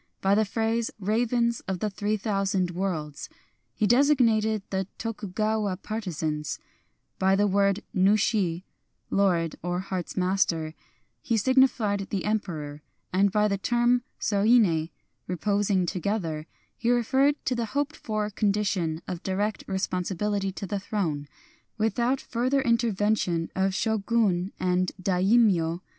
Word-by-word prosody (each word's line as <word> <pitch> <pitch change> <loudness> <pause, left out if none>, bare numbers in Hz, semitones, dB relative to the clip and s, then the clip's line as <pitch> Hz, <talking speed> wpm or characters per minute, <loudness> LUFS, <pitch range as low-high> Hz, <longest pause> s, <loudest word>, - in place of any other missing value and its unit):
By 195 +1 +2
the 215 +1 +3
phrase, 225 +2 -1
" - - -45
ravens 235 +3 +1
o£ 190 -2 -2
the 210 +2 -1
three 210 +2 -1
thousand 195 -3 0
worlds," 165 -5 -3 0.5
he - - +1
designated 230 -5 +3
the 190 -1 -1
Tokugawa 215 -2 -2
partisans; 160 -9 -3 0.6
by 190 +1 +4
the 205 +1 +3
word 200 0 +2
nushi 190 -2 +2 0.5
(lord, 175 -5 +1
or 175 +1 -2
heart' 185 -2 -4
s - - -10
master) 180 -4 +1 0.5
he 230 - 0
signified 220 -5 +2
the 195 -3 -2
Em 215 +1 +2
peror; 150 -7 -7 0.3
and 195 +1 +3
by 210 +1 +3
the 200 -2 -1
term 240 +3 +2 0.2
soine 200 -6 +3 0.4
(reposing 200 +1 +1
to 180 - -3
gether) 165 -5 -2 0.3
he 235 - -1
referred 265 +4 +3
to 255 - +1
the 235 -1 -1
hoped 290 +1 0
for 215 -2 -3
condition 200 -6 0
of 180 -1 -5
direct 205 +3 -2
responsibility 190 +1 -1
to 195 - -6
the 200 +1 -3
Throne, 170 -8 -2 0.5
without 235 +4 +1
further 255 +3 0
intervention 210 -7 +1
of 190 0 +1
Shogun 210 -4 +1
and 180 0 +1
daimyo. 185 -2 +2
200 Hz, 130 wpm, -26 LUFS, 185-220 Hz, 0.6 s, by